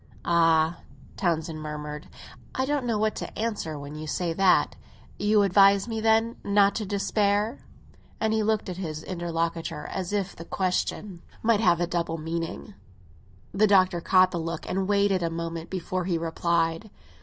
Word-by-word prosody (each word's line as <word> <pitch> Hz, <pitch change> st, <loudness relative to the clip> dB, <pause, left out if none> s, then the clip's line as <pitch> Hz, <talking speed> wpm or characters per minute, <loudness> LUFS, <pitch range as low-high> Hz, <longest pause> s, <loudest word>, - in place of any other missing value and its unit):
"Ah," 165 Hz, -1 st, +3 dB, 0.4 s
Townsend 160 Hz, -3 st, -1 dB
murmured, 150 Hz, 0 st, -6 dB, 0.5 s
"I 260 Hz, -, +1 dB
don't 280 Hz, -2 st, -1 dB
know 225 Hz, -2 st, +1 dB
what 215 Hz, 0 st, 0 dB
to -, -, -6 dB
answer 210 Hz, -9 st, -2 dB
when 145 Hz, +1 st, -8 dB
you 155 Hz, +1 st, -7 dB
say 170 Hz, +2 st, -1 dB
that! 190 Hz, +2 st, +3 dB, 0.4 s
You 210 Hz, 0 st, +3 dB
advise 195 Hz, +1 st, +5 dB
me, 225 Hz, -1 st, -3 dB
then, 225 Hz, +1 st, +2 dB
not 200 Hz, 0 st, +4 dB
to 215 Hz, -3 st, -3 dB
despair?" 205 Hz, +3 st, 0 dB, 0.6 s
And 220 Hz, 0 st, +1 dB
he 220 Hz, -, +2 dB
looked 215 Hz, 0 st, 0 dB
at 180 Hz, -2 st, -5 dB
his 160 Hz, -4 st, -5 dB
interlocutor 165 Hz, -3 st, -3 dB
as 185 Hz, -1 st, -4 dB
if 200 Hz, -2 st, -2 dB
the 165 Hz, -, -8 dB
question 185 Hz, 0 st, -2 dB, 0.2 s
might 225 Hz, -2 st, +3 dB
have 175 Hz, -6 st, +3 dB
a 175 Hz, -, +2 dB
double 170 Hz, -1 st, -2 dB
meaning. 165 Hz, +5 st, -5 dB, 0.8 s
The 210 Hz, +3 st, +3 dB
Doctor 185 Hz, -3 st, +4 dB
caught 185 Hz, +1 st, +4 dB
the 170 Hz, -, -2 dB
look 165 Hz, 0 st, -4 dB
and 190 Hz, 0 st, -1 dB
weighed 200 Hz, 0 st, +3 dB
it 185 Hz, -2 st, +1 dB
a 170 Hz, -, 0 dB
moment 165 Hz, 0 st, -5 dB
before 185 Hz, -1 st, -3 dB
he 175 Hz, -2 st, 0 dB
replied. 165 Hz, +3 st, 0 dB
185 Hz, 165 wpm, -26 LUFS, 165-205 Hz, 0.8 s, advise